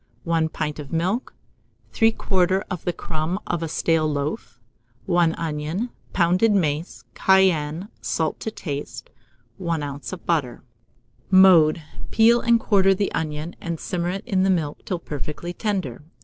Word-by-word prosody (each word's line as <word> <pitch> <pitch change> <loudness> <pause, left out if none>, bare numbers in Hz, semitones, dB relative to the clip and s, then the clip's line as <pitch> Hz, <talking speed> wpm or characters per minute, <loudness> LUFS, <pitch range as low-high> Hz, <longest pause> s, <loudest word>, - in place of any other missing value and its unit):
1 165 -1 +1
pint 150 -1 -4
of 145 -2 -8
milk, 185 +9 -1 0.6
3/4 190 -4 +2
of 180 - -5
the 175 - +1
crumb 160 +1 -3
of 175 -2 -2
a 165 - -2
stale 160 -1 +1
loaf, 145 - -4 0.5
1 175 -3 +2
onion; 165 +8 -3 0.2
pounded 180 +5 +3
mace, 150 - -1
cayenne, 175 -5 +3
and - - -11 0.2
salt 160 -2 -1
to - - -3
taste; 145 -9 -6 0.5
1 170 -4 -2
oz. 140 0 -6
of 185 -2 -8
butter. 145 -8 -1 0.7
Mode. 180 -5 +6 0.3
Peel 230 +2 +5
and 235 0 +4
quarter 195 -3 +3
the 200 +1 -1
onion, 155 +1 -3
and 170 -2 -4
simmer 175 -2 -2
it 195 +3 -4
in 190 -2 +1
the 190 - +3
milk 160 -6 -1
till 185 - -2
perfectly 150 +2 -6
tender. 190 - -3
170 Hz, 150 wpm, -23 LUFS, 155-190 Hz, 0.7 s, Mode